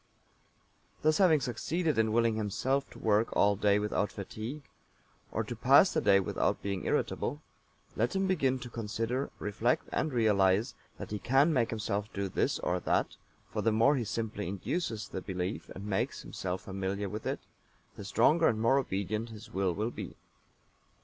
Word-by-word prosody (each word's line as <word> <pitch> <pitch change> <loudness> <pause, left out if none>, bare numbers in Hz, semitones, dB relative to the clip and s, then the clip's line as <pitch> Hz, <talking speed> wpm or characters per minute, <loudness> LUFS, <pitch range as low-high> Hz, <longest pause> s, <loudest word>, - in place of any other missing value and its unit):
Thus 155 0 +3
having 165 -6 +5
succeeded 150 +5 -1
in 110 -1 +2
willing 115 0 +3
himself 125 +6 -1
to - - -13
work 110 +1 +2
all 100 0 +4
day 100 0 +3
without 105 0 0
fatigue, 110 +8 -6 0.7
or - - -1
to - - -6
pass - - +5
the - - +1
day 100 - +5
without 95 - -1
being 100 -2 -3
irritable, - - -1 0.5
let 120 - 0
him 195 0 +1
begin 135 -9 +1
to 120 - -7
consider, 115 +4 -2
reflect 110 +4 0
and 155 - 0
realize 105 -3 +3 0.2
that - - -8
he 105 - -2
can 135 - +3
make 120 -5 +2
himself 105 -1 -2
do 100 -1 -2
this - - 0
or 90 +1 -1
that, - - 0 0.4
for - - -1
the 115 - +2
more 115 +7 +4
he 125 - 0
simply 105 -2 -3
induces 105 - -3
the 95 - -5
belief 95 +1 -4
and 95 - -8
makes 100 -2 -2
himself 90 0 -4
familiar 95 +1 -3
with 105 +3 -5
it, - - -2 0.5
the - - -8
stronger 125 +11 +4
and 110 - +1
more 115 +5 +4
obedient 105 -1 -2
his 110 -1 -11
Will 95 -1 +1
will 105 +7 -2
be. - - -7
110 Hz, 170 wpm, -31 LUFS, 100-125 Hz, 0.7 s, having